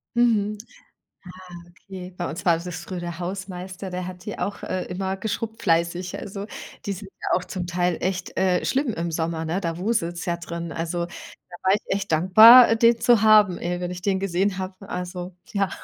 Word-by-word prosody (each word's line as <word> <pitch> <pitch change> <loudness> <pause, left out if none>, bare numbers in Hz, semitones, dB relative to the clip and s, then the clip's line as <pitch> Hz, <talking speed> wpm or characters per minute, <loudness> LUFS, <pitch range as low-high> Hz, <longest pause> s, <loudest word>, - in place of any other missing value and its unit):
Mhm. 215 -3 +2 1.1
Ah, - - -20
okay. 185 0 -10
Bei 175 - -3
uns 165 +3 -6
war 170 -2 +4
das 175 0 -6
früher 185 -2 -6
der 175 0 -6
Hausmeister, 185 +1 -6
der 180 0 -4
hat 180 0 -9
die 210 - -5
auch, 200 - -4
äh, 185 - -2
immer 190 +1 -3
geschrubbt 220 +3 -4
fleißig. 170 +2 0
Also, 200 0 -6 0.4
die 200 - -2
sind 195 0 -7
ja - - +1
auch 180 - -6
zum 180 -2 -5
Teil 175 0 0
echt, 185 0 -3
äh, 185 -1 +2
schlimm 265 -3 0
im 170 -1 -3
Sommer, 160 0 -2
ne? 175 +5 -2
Da 165 -1 -3
wuselts 180 -4 -1
ja 175 - 0
drin. 170 0 -6
Also, 170 +1 -2
da 175 0 -13
war 190 0 +4
ich 210 - 0
echt 195 -2 -2
dankbar, 220 +9 +9
äh, 225 - +3
den 230 0 +4
zu 240 -4 +4
haben, 215 -4 +6
ey, 175 +1 -3
wenn 180 0 -3
ich 180 0 -7
den 190 0 0
gesehen 190 0 0
habe. 190 +1 -7
Also, 180 0 -5 0.2
ja. 200 -2 +1
185 Hz, 200 wpm, -24 LUFS, 175-200 Hz, 1.1 s, dankbar